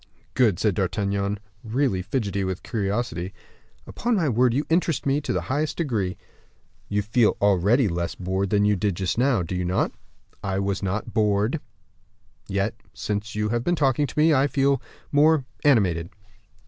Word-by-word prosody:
"Good," 115 -9 +3
said 105 +1 +1
D'Artagnan, 100 +1 -1 0.3
really 115 -4 0
fidgety 100 -2 -2
with 95 -1 -3
curiosity, 100 -4 -2 0.5
"upon 235 +1 -1
my 165 -7 +1
word 125 +1 +3
you 140 +6 0
interest 165 -3 +1
me 140 0 +2
in 150 - -2
the 90 - 0
highest 145 - -2
degree." 110 - -1 0.7
"You 105 0 0
feel 110 +2 +2
already 100 +5 +3
less 85 -2 -2
bored 95 +1 -2
than 105 0 +3
you 105 0 +3
did 100 0 0
just 95 +5 -1
now, 125 -7 +3
do 85 - -5
you 90 - -1
not?" 90 +2 0 0.5
"I 95 -1 -1
was 100 0 -1
not 100 +2 -3
bored; 105 +5 +1 0.9
yet 100 +3 0 0.2
since 105 +1 -3
you 105 0 0
have 120 +1 0
been 175 - +1
talking 145 -1 +2
to - - -11
me, 155 +1 +5
I 140 0 +4
feel 140 -1 +2 0.3
more 150 -1 +4 0.2
animated." 95 - +3
105 Hz, 165 wpm, -24 LUFS, 95-135 Hz, 0.9 s, me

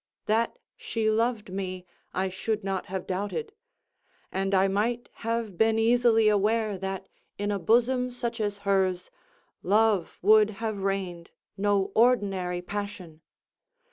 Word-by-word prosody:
That 230 - +1 0.2
she 220 -1 -1
loved 225 -3 0
me 185 -1 -4 0.3
I 190 +1 -1
should 210 +3 -3
not 195 -1 -3
have 190 0 -4
doubted; 205 - -3 0.8
and 195 +1 0
I 190 +1 +4
might 225 +5 -1
have 230 -5 -3
been 220 0 +4
easily 225 -1 +4
aware 215 +1 +2
that, 190 0 -4 0.3
in 205 +1 -1
a 200 - -1
bosom 245 +5 +2
such 240 -2 -4
as 205 -1 -1
hers, 190 -2 +1 0.5
love 205 -2 +2
would 215 +1 +6
have 220 -3 -3
reigned 190 -3 -3 0.3
no 200 0 +1
ordinary 195 -7 +2
passion. 190 -5 -6
205 Hz, 130 wpm, -27 LUFS, 190-225 Hz, 0.8 s, would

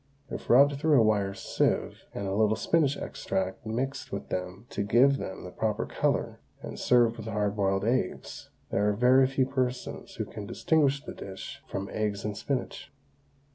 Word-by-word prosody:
If - - -6
rubbed 140 +3 +6
through 150 -3 +4
a - - +6
wire 100 -3 +1
sieve - - -1
and 100 - -5
a 95 - -2
little 110 +1 +3
spinach 145 -1 +2
extract 95 +4 -3
mixed 130 +5 -3
with - - -5
them 90 +4 -4
to - - -2
give 125 +7 +4
them 95 - -6
the 90 - -8
proper 110 +1 -1
colour, - - -1 0.2
and - - -7
served 120 -2 +3
with 110 -1 -7
hard 105 -2 -1
boiled 95 -1 +1
eggs, 120 -5 -2 0.2
there 105 +1 +2
are - - +2
very 125 +4 +5
few 135 0 +1
persons 130 -1 -3
who - - -3
can 105 -2 -8
distinguish 140 +2 +2
the - - -7
dish 95 -1 -8
from 100 0 -4
eggs 105 -2 -2
and 105 -1 -2
spinach. 130 +5 -4
110 Hz, 175 wpm, -28 LUFS, 100-130 Hz, 0.2 s, rubbed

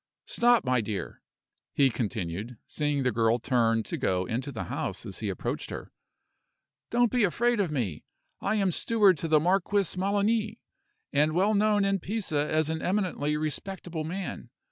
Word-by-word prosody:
Stop, 240 -4 +3
my 125 -1 +2
dear," 105 -2 -5 0.5
he 135 -2 +4
continued, 105 0 -4
seeing 145 -2 -1
the 125 - +2
girl 115 +1 +2
turn 115 -3 +1
to - - -4
go 90 0 0
into 125 +8 -3
the 115 - -4
house - - -4
as - - -7
he - - -2
approached - - -3
her. - - -7 1.0
"Don't 240 -1 +3
be 245 -3 +2
afraid 235 +5 +2
of 195 -4 +1
me. 115 - -2 0.4
I - - 0
am 195 -3 +2
steward 205 0 +3
to 165 - -2
the 155 -1 +5
Marquis 190 +3 +1
Melani, 210 +3 +1 0.6
and 150 +2 +3
well 195 +5 +3
known 210 -1 +3
in 195 0 +1
Pisa 175 -7 -2
as 155 -1 +2
an 160 - -3
eminently 180 -6 0
respectable 160 +2 -4
man. 180 +4 -5
160 Hz, 165 wpm, -28 LUFS, 125-200 Hz, 1.0 s, the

